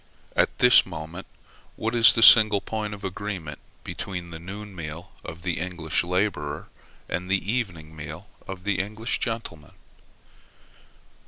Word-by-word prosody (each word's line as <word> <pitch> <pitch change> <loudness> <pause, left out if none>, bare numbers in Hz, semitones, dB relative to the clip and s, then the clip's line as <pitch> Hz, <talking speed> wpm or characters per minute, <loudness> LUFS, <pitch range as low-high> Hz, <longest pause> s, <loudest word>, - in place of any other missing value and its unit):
At - - +2
this 125 0 +7
moment, 85 +1 -8 0.5
what 115 +1 -2
is 115 -1 +8
the 115 - +3
single 110 -3 +9
point 105 0 -4
of 100 - -14
agreement 95 -5 -5 0.2
between 90 -3 -6
the 80 - -7
noon 100 +3 -8
meal 85 +2 -7
of 85 +1 -9
the 90 -3 -2
English 85 -3 -1
laborer 90 -5 -2 0.4
and 90 +1 -4
the 95 +2 0
evening 85 -10 -3
meal 80 +5 -8 0.2
of 95 -1 -7
the 100 -1 0
English 110 +4 -2
gentleman? 115 - -5
95 Hz, 140 wpm, -25 LUFS, 85-105 Hz, 0.5 s, single